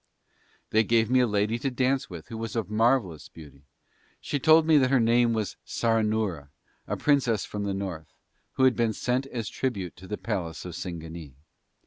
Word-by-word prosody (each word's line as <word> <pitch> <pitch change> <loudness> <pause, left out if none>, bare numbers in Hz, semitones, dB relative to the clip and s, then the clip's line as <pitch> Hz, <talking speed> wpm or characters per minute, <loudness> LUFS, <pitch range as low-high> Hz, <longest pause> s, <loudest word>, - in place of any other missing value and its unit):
They 110 +1 +4
gave 115 +1 +2
me 130 - +5
a 125 - +3
lady 105 +2 0
to 135 - -1
dance 130 0 0
with 85 -4 -9
who 115 - -6
was 115 0 -5
of 110 -3 -2
marvellous 110 - +1
beauty, 70 -3 -15 0.5
she 145 - -3
told 160 +3 +6
me 155 -2 +5
that 130 -1 +2
her 135 -1 +4
name 115 +1 +3
was 110 -3 -3
Saranoora, 110 -9 0 0.4
a - - -2
princess 125 -8 +2
from 105 -1 -4
the 100 - -1
North, 90 -6 -5 0.4
who 130 - 0
had 130 -1 +5
been 115 -2 +1
sent 125 +4 -1
as 115 -6 -5
tribute 100 -10 -3
to 95 - -12
the 105 - -4
palace 95 -6 -4
of 90 - -6
Singanee. 85 -4 -7
110 Hz, 185 wpm, -27 LUFS, 90-125 Hz, 0.5 s, told